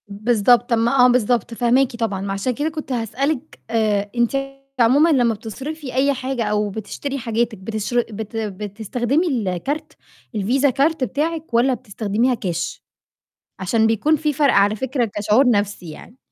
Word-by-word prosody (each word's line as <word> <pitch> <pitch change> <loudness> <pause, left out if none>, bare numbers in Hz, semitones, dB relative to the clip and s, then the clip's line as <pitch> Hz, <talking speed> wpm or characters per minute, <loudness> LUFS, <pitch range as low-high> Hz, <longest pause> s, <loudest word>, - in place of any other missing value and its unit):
بالضبط، 235 +3 +2
ما 240 +3 +4
آه - - +8
بالضبط 245 -2 +1
فاهماكِ 245 +2 +2
طبعًا، 220 -5 -2
ما 195 0 -3
عشان 195 +6 -1
كده 295 +6 -1
كنت 310 -3 -7
هاسألِك 270 +5 -2
آآ 210 -3 0
أنتِ 240 +3 +1 0.4
عمومًا 270 +8 +5
لمّا 245 -7 +3
بتصرفي 260 +7 -7
أي 275 +2 +2
حاجة 260 -2 -3
أو 210 -1 0
بتشتري 220 +7 -5
حاجاتِك 230 -2 -1
بتشر 220 +4 -2
بت 220 0 -7
بتستخدمي 220 - -2
الكارت 240 - -2 0.4
الفيزا 250 +8 +2
كارت 280 +3 +1
بتاعِك، 305 +4 -2
والّا 245 +3 +3
بتستخدميها 220 +2 -1
كاش؟ 175 -6 -4 0.8
عشان 220 +4 +2
بيكون 225 +8 +2
في 300 0 -1
فَرْق 285 0 +3
على 200 +2 +4
فكرة 255 +2 -1
كشعور 215 +6 +3
نفْسي 205 -5 -1
يعني. 220 +10 -12
235 Hz, 145 wpm, -21 LUFS, 210-270 Hz, 0.8 s, آه